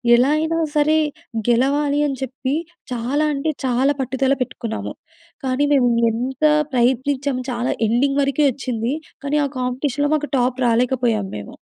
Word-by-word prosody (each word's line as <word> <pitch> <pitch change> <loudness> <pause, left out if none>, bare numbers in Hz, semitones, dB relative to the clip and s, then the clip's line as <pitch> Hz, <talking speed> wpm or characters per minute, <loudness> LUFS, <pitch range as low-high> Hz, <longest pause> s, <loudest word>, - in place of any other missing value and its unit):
ఎలా 255 +4 +3
అయినా 320 +1 0 0.2
సరే 300 +1 +3 0.5
గెలవాలి 280 +4 +2
అని 275 -2 -3
చెప్పి 265 +1 -3 0.4
చాలా 250 +5 0
అంటే 290 +3 -1
చాలా 260 +3 +2
పట్టుదల 265 +1 +1
పెట్టుకున్నాము. 240 -3 -4 0.5
కానీ 260 +2 +1
మేము 255 -3 +4 0.2
ఎంత 255 +5 -4 0.3
ప్రయత్నించాము 260 +2 +1
చాలా 240 0 -1
ఎండింగ్ 275 +5 +2
వరకే 280 +1 +2
వచ్చింది. 245 -1 -3 0.3
కానీ 285 +1 0
ఆ - - 0
కాంపిటీషన్‌లో 265 +3 -1
మాకు 295 -1 -2
టాప్ 250 +1 +1
రాలేకపోయాము 235 -3 +1
మేము. 105 - -9
260 Hz, 135 wpm, -20 LUFS, 245-285 Hz, 0.5 s, మేము